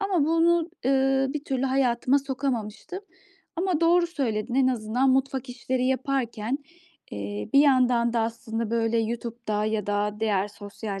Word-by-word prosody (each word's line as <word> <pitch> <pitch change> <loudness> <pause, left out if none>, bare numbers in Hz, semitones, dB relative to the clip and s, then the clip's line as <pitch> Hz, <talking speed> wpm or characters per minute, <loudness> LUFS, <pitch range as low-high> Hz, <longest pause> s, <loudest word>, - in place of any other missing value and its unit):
ama 380 -7 +1
bunu, 330 +1 +2 0.2
ııı, 270 0 +2
bir 295 - -4
türlü 265 -3 -2
hayatıma 260 0 +2
sokamamıştım 265 - -4 0.6
ama 355 -2 0
doğru 345 +1 +4
söyledin. 245 -7 -2
En 265 -1 +4
azından 245 +2 +1
mutfak 265 0 0
işleri 255 +1 -2
yaparken, 260 -2 -1 0.5
eee, 100 0 -5
bir 275 - +7
yandan 250 -4 +3
da 230 - +1
aslında, 225 0 -3
böyle, 230 0 +1
YouTube'da 225 -2 -2
ya 215 -2 -1
da 205 0 -1
diğer 205 -2 +1
sosyal 205 -1 -7
250 Hz, 140 wpm, -26 LUFS, 220-275 Hz, 0.6 s, bir